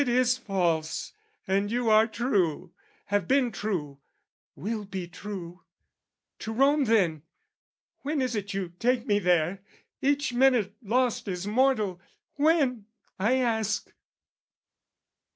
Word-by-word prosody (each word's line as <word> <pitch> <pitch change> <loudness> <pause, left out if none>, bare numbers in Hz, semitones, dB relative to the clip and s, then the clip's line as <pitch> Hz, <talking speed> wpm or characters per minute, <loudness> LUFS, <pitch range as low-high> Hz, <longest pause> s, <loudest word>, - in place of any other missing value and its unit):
It 275 - 0
is 250 0 +3
false, 175 -9 -1 0.3
"And 200 +2 +1
you 240 -1 +1
are 215 +1 +6
true, 195 - -1 0.4
have 200 -4 +1
been 265 -3 +3
true, 170 -10 -3 0.6
will 215 +2 -4
be 190 -3 -6
true. 180 -1 -8 0.8
"To 220 - -5
Rome 275 +5 +3
then, 185 - +2 0.8
when 295 +2 -2
is 255 -3 -1
it 205 -1 -3
you 190 -3 -4
take 245 0 +1
me 205 -4 +2
there? 180 0 +1 0.4
"Each 285 -1 +1
minute 240 -6 +3
lost 245 +2 0
is 180 -1 -3
mortal. 215 -5 +1 0.3
When? 285 -8 +2 0.3
I 220 +7 +3
ask." 220 -5 -1
215 Hz, 120 wpm, -27 LUFS, 190-250 Hz, 0.8 s, are